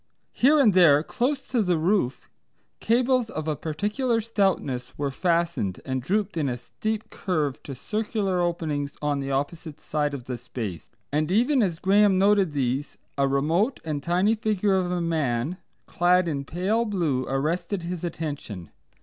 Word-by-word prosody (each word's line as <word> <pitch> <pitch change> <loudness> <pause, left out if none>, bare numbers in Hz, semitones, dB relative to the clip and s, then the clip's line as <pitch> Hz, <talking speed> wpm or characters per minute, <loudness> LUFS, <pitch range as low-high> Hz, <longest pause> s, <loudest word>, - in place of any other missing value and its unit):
Here 295 +5 +4
and 225 -8 +5
there 155 -5 +6
close 265 - -1
to 245 -3 +2
the 180 -4 +1
roof 160 -6 0 0.5
cables 245 0 +2
of 155 -5 -5
a 155 - 0
peculiar 210 - -1
stoutness 190 - -1
were 140 -1 -1
fastened, 170 - 0
and 130 -1 -2
drooped 195 - -1
in 145 -4 0
a 120 - -2
steep 215 - -4
curve 155 -8 -2
to 135 - -7
circular 205 - -1
openings 155 -5 -2
on 145 -1 0
the 135 0 -4
opposite 145 +3 -3
side 150 -2 -1
of 130 - -7
the 125 0 -5
space, 110 -8 -6 0.2
and 150 +1 0
even 245 +7 +3
as 180 -6 0
Graham 195 +1 +4
noted 195 -4 +3
these 135 +1 -1 0.2
a 140 -1 +2
remote 160 - +1
and 150 -3 -2
tiny 180 +7 +2
figure 210 -2 0
of 185 -2 0
a 180 -1 -1
man 155 -2 -1 0.3
clad 180 +1 +2
in 140 -4 -2
pale 190 +10 0
blue 170 - -1
arrested 165 +7 -1
his 175 0 -4
attention. 145 - -5
170 Hz, 160 wpm, -25 LUFS, 140-205 Hz, 0.5 s, there